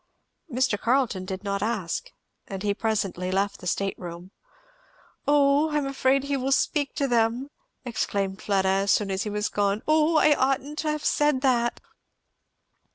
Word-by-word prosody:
Mr. 245 -4 0
Carleton 235 -7 +1
did 190 +1 -5
not 200 -1 -2
ask, 215 - -2 0.4
and 195 -1 -6
he 205 -1 +1
presently 200 -4 -2
left 200 +1 0
the 180 - -7
state 195 +2 0
room. 175 +1 -8 1.0
"O 290 +1 +4
I 300 - 0
am 290 - 0
afraid 270 0 +1
he 280 0 -1
will 270 0 -1
speak 285 +1 +1
to 280 - 0
them!" 240 +3 +1 0.3
exclaimed 200 -5 -2
Fleda 195 -2 +1
as 195 +1 +1
soon 200 -2 +1
as 190 0 -1
he 210 - -2
was 210 0 -1
gone. 205 +1 0
"O 310 +1 +3
I 300 0 +5
oughtn't 275 +2 0
to 310 - -1
have 300 0 -3
said 295 -3 +2
that!" 240 -3 +1
230 Hz, 165 wpm, -26 LUFS, 195-275 Hz, 1.0 s, I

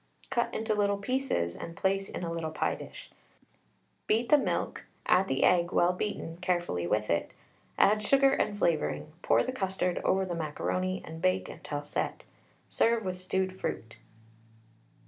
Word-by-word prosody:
Cut 240 -2 +1
into 220 0 -1
little 200 -1 +2
pieces 250 - -1
and 165 - -8
place 195 0 0
in - - -5
a 170 - -2
little 165 -1 -2
pie 155 - 0
dish; - - -10 1.0
beat 230 +3 +2
the 300 - +8
milk, - - -2 0.2
add 190 +1 +4
the 135 - +1
egg, 175 -1 +4
well 175 0 +3
beaten, 180 -4 -4
carefully 175 - -1
with 105 +3 0
it, 85 - 0 0.5
add 210 +1 +5
sugar 270 +5 +4
and 210 -6 0
flavouring, 155 -4 0
pour - - +3
the 255 - -2
custard 190 -6 -1
over 190 0 +2
the 180 - -3
macaroni, 185 +4 -2
and 160 0 -8
bake 90 0 +2
until 145 -1 -5
set. 145 - -3 0.4
Serve 230 -2 +2
with 185 -1 -3
stewed 185 0 -1
fruit. 115 0 -4
185 Hz, 160 wpm, -30 LUFS, 165-205 Hz, 1.0 s, the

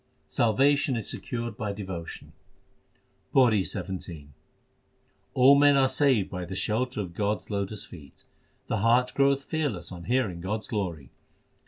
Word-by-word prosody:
Salvation 135 +4 +2
is 115 -4 -3
secured 120 -4 -4
by 105 -2 -3
devotion: 95 -5 -7 1.0
PAURI 120 -6 +5
XVII 85 -6 -6 1.1
All 130 +2 +7
men 145 0 +5
are 135 -1 +4
saved 130 -7 +2
by 90 -2 -4
the 90 +2 -6
shelter 110 +4 -1
of 90 -4 -7
God 105 +2 0
s - - -15
lotus 100 +1 -3
feet. 70 -6 -14 0.4
The 110 - -1
heart 120 +4 +3
groweth 140 0 +2
fearless 135 - -3
on 85 -2 -8
hearing 115 -9 0
God 105 +4 -2
s - - -9
glory 85 - -4
110 Hz, 145 wpm, -27 LUFS, 95-130 Hz, 1.1 s, All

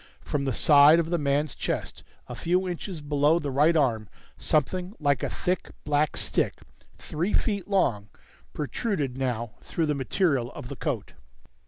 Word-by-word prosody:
From 140 -2 -2
the 135 - 0
side 145 +4 +6
of 165 0 -1
the 175 - +1
man's 145 0 0
chest, - - -4 0.2
a - - -7
few 180 +2 0
inches 175 -1 -5
below 145 +2 +2
the 145 -5 -3
right 150 +5 +4
arm, 115 -8 +1 0.3
something 180 - 0
like 145 -4 +1
a - - -2
thick 180 +1 -2
black 150 0 +1
stick, - - 0 0.4
three 170 +7 -3
feet 200 -5 0
long, 125 - +1 0.4
protruded 145 - -2
now 120 -4 -2
through 165 - -2
the 150 - 0
material 140 -2 0
of 125 - -8
the 140 - -6
coat. 130 -7 -4
150 Hz, 160 wpm, -26 LUFS, 135-170 Hz, 0.4 s, side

